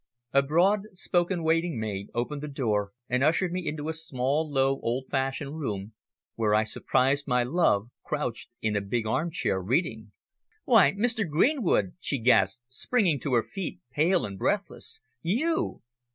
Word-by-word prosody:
A 140 - +6
broad 185 +9 +2
spoken 175 -1 0
waiting 165 -3 +1
maid 100 -2 -4
opened 140 +5 -2
the 150 - -5
door 110 -8 -1 0.2
and 125 +1 +1
ushered 170 +4 +2
me 180 -2 -3
into 150 0 -3
a 160 - -1
small, 150 0 -1
low, 135 0 +2
old 125 +3 -2
fashioned 135 +3 -2
room, 105 -6 -4 0.4
where 105 -2 +1
I 110 - +4
surprised 135 +6 +1
my 125 -2 +3
love 120 - +1
crouched 125 -5 -4
in 110 -1 +1
a 100 - +1
big 110 +3 -2
armchair, 150 - 0
reading. 110 - -1 0.5
"Why? 140 - +6
Mr. 220 -2 0
Greenwood!" 170 - +2
she 140 - -1
gasped, 110 -2 +3
springing 165 - +1
to 130 0 0
her 115 - +3
feet, 195 -4 -6
pale 165 - +2
and 100 -2 -7
breathless, - - -1 0.2
"you!" 285 - 0
140 Hz, 155 wpm, -27 LUFS, 115-165 Hz, 0.5 s, A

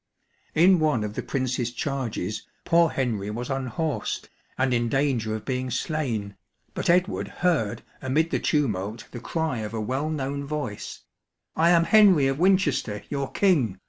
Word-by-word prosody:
In 180 +3 +6
one 150 -8 +2
of 105 -1 -4
the - - -3
Prince's 130 -2 -2
charges 120 - -3 0.2
poor 170 -1 +4
Henry 115 -8 -2
was 120 +5 -4
unhorsed, 135 0 -2 0.3
and 130 -1 +1
in 120 -1 +1
danger 125 -5 0
of 110 - -7
being 130 -1 -2
slain, 120 -9 -2 0.4
but - - -2
Edward 180 +2 +2
heard 115 - 0 0.2
amid 150 +5 +1
the - - +1
tumult 110 - -1
the 120 - -6
cry 160 0 -2
of 110 +1 -5
a - - -2
well 130 +8 -1
known 140 -2 -3
voice, 140 -8 -5 0.3
" - - -55
I 165 +1 +4
am 170 -1 +5
Henry 190 -5 +6
of 135 +1 0
Winchester, 165 - +2
your 140 -2 -3
king 140 - +2
135 Hz, 160 wpm, -25 LUFS, 115-155 Hz, 0.4 s, In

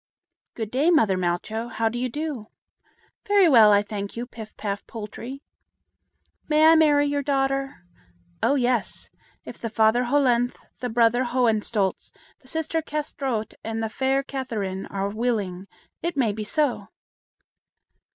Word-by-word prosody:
"Good 220 -2 -4
day, 280 +6 +2
mother 265 - +4
Malcho. 185 +6 -2
How 225 0 0
do 235 +2 -2
you 255 +1 -1
do?" 290 -5 -4 0.8
"Very 405 -3 +5
well, 225 -8 +7
I 205 0 +4
thank 205 0 -6
you, 240 - -3
Pif 220 -3 -11
paf 200 -1 -3
Poltrie." 230 +5 -8 1.0
"May 305 0 +4
I 320 - +8
marry 295 -2 +4
your 285 0 0
daughter?" 275 -5 -1 0.6
"Oh, 280 - +3
yes! 245 -5 -1 0.3
if - - -9
the 230 - -4
father 220 +3 +3
Hollenthe, 245 -2 +2 0.2
the 250 - -3
brother 235 +2 +3
Hohenstolz, 225 -5 0 0.3
the 260 - -22
sister 320 +2 -1
Kâsetraut, 275 -7 -3
and 225 0 -3
the 220 - -1
fair 265 +4 0
Catherine 220 -9 -4
are 195 0 -2
willing, 200 -4 -2 0.3
it 340 -1 -3
may 240 -6 +2
be 215 0 -5
so." 255 -6 0
240 Hz, 140 wpm, -24 LUFS, 215-275 Hz, 1.0 s, I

